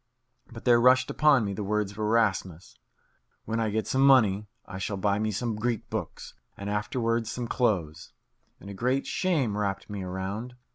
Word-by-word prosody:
But 115 -1 -11
there 120 -1 +5
rushed 130 +1 +4
upon 145 -7 +4
me 100 - -3
the 105 - -4
words 105 0 -1
of 100 - -13
Erasmus, 105 - 0 0.7
"When 115 +1 -2
I 110 -1 0
get 110 +1 -1
some 130 - 0
money 110 -7 +4 0.2
I 95 - -8
shall 100 +1 -3
buy 100 +1 +1
me 110 0 0
some 110 +2 -2
Greek 115 +1 -3
books, - - -5 0.2
and 100 +1 -5
afterwards 115 +2 -1
some 120 -1 -4
clothes," 95 -12 -1 0.5
and - - -13
a 100 - -7
great 125 +7 0
shame 150 - 0
wrapped 100 -1 -3
me 100 -1 -4
around. 95 +6 -5
110 Hz, 180 wpm, -27 LUFS, 100-120 Hz, 0.7 s, there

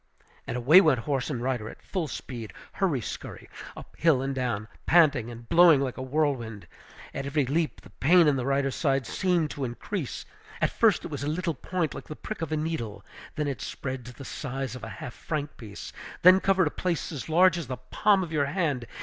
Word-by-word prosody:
And 120 - -2
away 150 +10 +7
went 150 -10 +3
horse 135 -2 -1
and 125 -5 -3
rider 125 -4 -2
at - - -12
full 180 -5 -2
speed, 115 -9 -7 0.2
hurry 165 -10 0
scurry, - - -7 0.3
up - - -11
hill 155 -6 +3
and 135 0 -2
down, 120 -5 -2 0.2
panting 145 -9 +4
and 120 0 -10
blowing 170 -2 +7
like 135 -2 -2
a - - -6
whirlwind. 130 - -1 0.5
At 135 - -4
every 140 0 +1
leap 155 +5 -1
the - - -16
pain 170 +4 +5
in 145 - +4
the 130 -1 -2
rider's 135 -1 +1
side 135 -4 +1
seemed 175 - 0
to 140 - -5
increase. 135 - -4 0.3
At - - +1
first - - +3
it - - -6
was - - -4
a - - -2
little 165 +2 -1
point 165 +4 -2
like - - -9
the 155 - -7
prick 215 +2 -7
of 160 -2 -3
a 155 - +1
needle, 130 -11 -4 0.3
then 150 -1 -1
it 140 -3 -3
spread 130 -1 -5
to 125 - -9
the 135 - -10
size 135 -3 -4
of 125 - -9
a - - -5
half 120 - -7
franc 150 -2 -4
piece, 105 -3 -9 0.3
then 185 +1 +9
covered 190 -2 +3
a 150 - -1
place 175 -6 -2
as 150 0 -6
large 180 +2 +5
as 160 - -6
the 130 0 -4
palm 190 +10 +2
of 170 - -7
your 150 -3 +1
hand. 145 -7 -1
140 Hz, 220 wpm, -27 LUFS, 125-165 Hz, 0.5 s, then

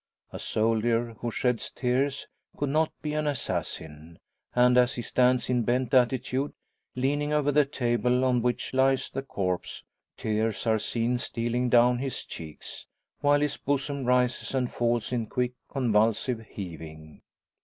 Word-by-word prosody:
A - - -5
soldier 115 +1 +1
who 120 - -2
sheds 125 0 -1
tears 135 +2 0 0.3
could 145 - -1
not 155 +2 +2
be 150 -1 -2
an 150 0 0
assassin; 80 - -4 0.4
and 125 0 +5
as 125 +1 +4
he 120 - -4
stands 125 +1 +2
in 125 -1 +2
bent 125 +1 0
attitude, 130 +2 +2 0.4
leaning 145 +3 0
over 145 -1 +2
the 145 0 +4
table 125 -1 +1
on 125 -2 +2
which 125 +1 -1
lies 135 0 +2
the 135 - -3
corpse, 95 -9 -3 0.3
tears 110 -1 -1
are 110 -1 +3
seen 120 +3 0
stealing 120 +1 -1
down 120 0 +5
his 135 0 -3
cheeks, 80 -2 -9 0.3
while 145 0 +3
his 150 -1 0
bosom 140 0 -1
rises 125 +1 +1
and 125 -2 -1
falls 120 -1 0
in 120 -3 -1
quick, 125 +1 -1 0.2
convulsive 115 -1 +1
heaving. 80 -4 -9
125 Hz, 145 wpm, -27 LUFS, 115-135 Hz, 0.4 s, and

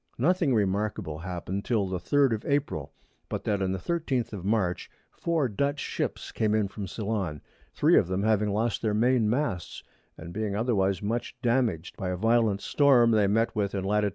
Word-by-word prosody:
Nothing 160 0 +2
remarkable 100 -6 -1
happen'd 90 +3 -4
till 110 -5 +1
the 95 -1 -3
3_d_ 135 +7 +2
of 110 - -3
April, 145 0 -1 0.4
but - - -4
that 100 -2 0
on 95 -1 0
the 95 - -1
13_th_ 135 - -2
of 95 -4 -6
March 100 -3 0 0.2
4 165 -5 0
Dutch 140 +6 -1
Ships - - -3
came 110 -1 +1
in 105 -2 +2
from 100 0 -6
Ceylon, 100 -8 -3 0.4
3 - - +5
of - - -1
them 95 +2 -1
having 105 -1 +2
lost 110 +2 0
their 110 -2 0
Main 120 0 +3
Masts, 110 - -2 0.3
and 85 +2 -9
being 105 -1 -2
otherwise 100 -5 +1
much 115 +3 -3
damaged 115 -9 0
by 95 - -3
a 90 - -2
violent 110 -1 +2
Storm 130 -5 +4
they 105 -3 +4
met 115 +3 +1
with 100 -1 -1
in 95 - -2
Lat. 105 +2 +1
105 Hz, 185 wpm, -27 LUFS, 95-120 Hz, 0.4 s, 3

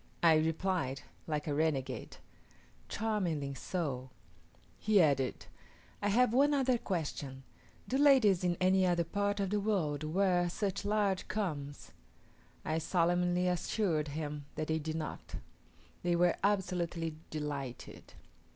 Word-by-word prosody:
I 165 -1 +7
replied, 160 -3 0 0.2
like 150 -2 -2
a 150 - -1
renegade, 135 -5 -1 0.7
"Charmingly 180 -11 -1
so." 135 -5 -3 0.7
He 215 -2 +3
added, 140 -6 +2 0.6
"I 205 - +1
have 240 +3 +3
one 285 +3 +4
other 260 -3 +2
question: 145 - -4 0.4
Do 265 - 0
ladies 255 -11 +5
in 175 -1 +1
any 185 +1 +4
other 175 -2 +2
part 205 +4 -1
of 195 -1 -1
the 210 - +2
world 170 -9 0
wear 175 +2 +2
such 200 +2 -2
large 205 -2 +1
combs?" 145 -9 -4 0.7
I 155 +1 0
solemnly 175 +1 +1
assured 180 -3 0
him 145 0 -5
that 155 - -3
they 160 0 +1
did 155 +1 -4
not. 155 -1 -5 0.7
They 175 -1 +1
were 175 0 +3
absolutely 175 -5 0
delighted. 145 -5 -6
175 Hz, 125 wpm, -33 LUFS, 150-200 Hz, 0.7 s, I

